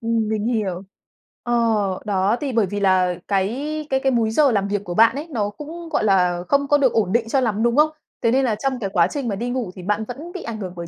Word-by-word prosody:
Ừm, 225 -1 0
mình 220 0 -1
hiểu. 200 -6 -1 0.6
Ờ, 240 - -2 0.5
đó, 200 +2 +1
thì 280 -3 -2
bởi 225 -3 +3
vì 205 +2 -4
là 185 -2 +2
cái 195 -1 +1 0.4
cái 265 0 +1
cái 270 0 +1
múi 230 -2 +1
giờ 285 +1 +4
làm 200 -2 0
việc 205 0 -2
của 175 - -5
bạn 225 +5 +5
ấy 300 +4 -5
nó 210 -5 -1
cũng, 325 +8 -9
gọi - - 0
là, 180 -3 +2
không 280 0 +2
có 290 - +4
được 265 -4 +2
ổn 200 -5 +1
định 230 -1 +1
cho 270 +1 +2
lắm, 220 -2 0
đúng 235 0 +2
không? 300 +2 +5 0.3
Thế 230 -1 +2
nên 265 +1 +3
là 220 -3 +1
trong 260 +3 -2
cái 195 - -3
quá 175 -3 +4
trình 280 -5 -4
mà 200 - -1
đi 240 +4 -3
ngủ 245 -7 -3
thì 180 - -9
bạn 210 +3 0
vẫn 295 +8 -8
bị 370 - -6
ảnh 230 -2 -5
hưởng 185 -3 -6
bởi 170 -1 -6
225 Hz, 270 wpm, -21 LUFS, 195-260 Hz, 0.6 s, bạn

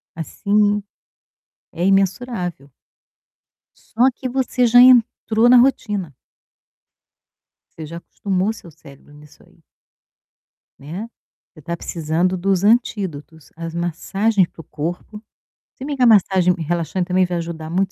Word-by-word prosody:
Assim, 205 +5 0 0.9
é 175 - -3
imensurável. 190 - -1 1.0
Só 250 +4 +1
que 255 - -5
você 250 -1 0
já 245 +1 +6
entrou 240 -2 +4
na 250 - +7
rotina. 210 - +1 1.6
Você 160 - -7
já 170 +2 -8
acostumou 195 +3 -2
seu 180 - -14
cérebro 140 0 -17
nisso 150 0 -18
aí. - - -26 1.2
Né. 175 +11 -7 0.4
Você 155 - -16
está 170 +3 -5
precisando 170 +3 -2
dos 190 +1 0
antídotos. 190 - -1
As 165 0 -7
massagens 190 +4 0
para - - -16
o - - -10
corpo 175 +8 -6 0.5
se 265 - -10
bem 290 -1 -4
que 255 - -1
a - - +6
massagem 190 -4 +4
relaxante 170 +2 -2
também 185 +1 +2
vai 175 -1 -3
ajudar 165 -2 -6
muito 190 +2 0
185 Hz, 125 wpm, -20 LUFS, 165-220 Hz, 1.6 s, na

